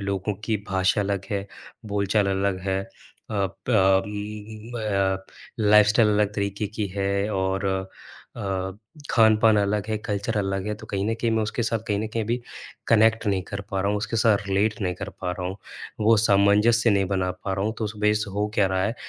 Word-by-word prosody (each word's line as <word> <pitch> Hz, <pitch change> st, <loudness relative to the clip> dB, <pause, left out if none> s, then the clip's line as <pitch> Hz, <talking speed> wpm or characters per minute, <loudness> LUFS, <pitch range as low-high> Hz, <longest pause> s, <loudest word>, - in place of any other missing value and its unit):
लोगों 100 Hz, +1 st, -2 dB
की 110 Hz, -1 st, +1 dB
भाषा 95 Hz, +1 st, +2 dB
अलग 100 Hz, -1 st, -1 dB
है, 100 Hz, 0 st, -2 dB, 0.4 s
बोलचाल 100 Hz, 0 st, +1 dB
अलग 95 Hz, -1 st, 0 dB
है 95 Hz, 0 st, 0 dB
अ, -, -, -16 dB, 0.5 s
प 95 Hz, -1 st, +2 dB
म 105 Hz, +3 st, -7 dB
अ, 95 Hz, -3 st, 0 dB, 0.4 s
लाइफस्टाइल 105 Hz, +1 st, +5 dB
अलग 105 Hz, 0 st, +1 dB
तरीक़े 100 Hz, 0 st, -2 dB
की 105 Hz, 0 st, -3 dB
है 100 Hz, +1 st, 0 dB
और 95 Hz, +1 st, -1 dB, 0.7 s
अ, 95 Hz, -1 st, -3 dB, 0.4 s
खान-पान 110 Hz, -1 st, +5 dB
अलग 105 Hz, 0 st, +1 dB
है 110 Hz, -, 0 dB
कल्चर 105 Hz, +1 st, -3 dB
अलग 95 Hz, -1 st, -2 dB
है 105 Hz, -, -1 dB
तो 110 Hz, +1 st, -12 dB
कहीं 100 Hz, -2 st, -2 dB
न -, -, 0 dB
कहीं 115 Hz, -, +1 dB
मैं 110 Hz, 0 st, +1 dB
उसके 110 Hz, +3 st, -2 dB
साथ 115 Hz, 0 st, 0 dB
कहीं 105 Hz, -1 st, +1 dB
न 110 Hz, -, -2 dB
कहीं 115 Hz, -1 st, -1 dB
भी 120 Hz, +3 st, -1 dB, 0.5 s
कनेक्ट 110 Hz, 0 st, +4 dB
नहीं 100 Hz, -2 st, +1 dB
कर 100 Hz, -, -4 dB
पा 95 Hz, -1 st, -1 dB
रहा 100 Hz, -, 0 dB
हूँ, 105 Hz, -, +1 dB
उसके 105 Hz, +2 st, -3 dB
साथ 110 Hz, -2 st, +4 dB
रीलेट 100 Hz, +2 st, 0 dB
नहीं 90 Hz, -3 st, -1 dB
कर 100 Hz, +3 st, -6 dB
पा 90 Hz, -, -2 dB
रहा 90 Hz, 0 st, -4 dB
हूँ। 95 Hz, +1 st, -4 dB, 0.4 s
वो 110 Hz, +1 st, +5 dB
सामंजस्य 105 Hz, +3 st, +4 dB
नहीं 100 Hz, -1 st, +3 dB
बना 95 Hz, -1 st, 0 dB
पा 95 Hz, -, -1 dB
रहा 95 Hz, -, -1 dB
हूँ 110 Hz, -, 0 dB
तो 110 Hz, -, -1 dB
उस 105 Hz, -, -3 dB
वजह 105 Hz, 0 st, +3 dB
से 105 Hz, -, -6 dB
हो 105 Hz, +2 st, -1 dB
क्या 100 Hz, -, +3 dB
रहा 95 Hz, 0 st, 0 dB
है 110 Hz, -, -1 dB
105 Hz, 205 wpm, -24 LUFS, 95-110 Hz, 0.7 s, लाइफस्टाइल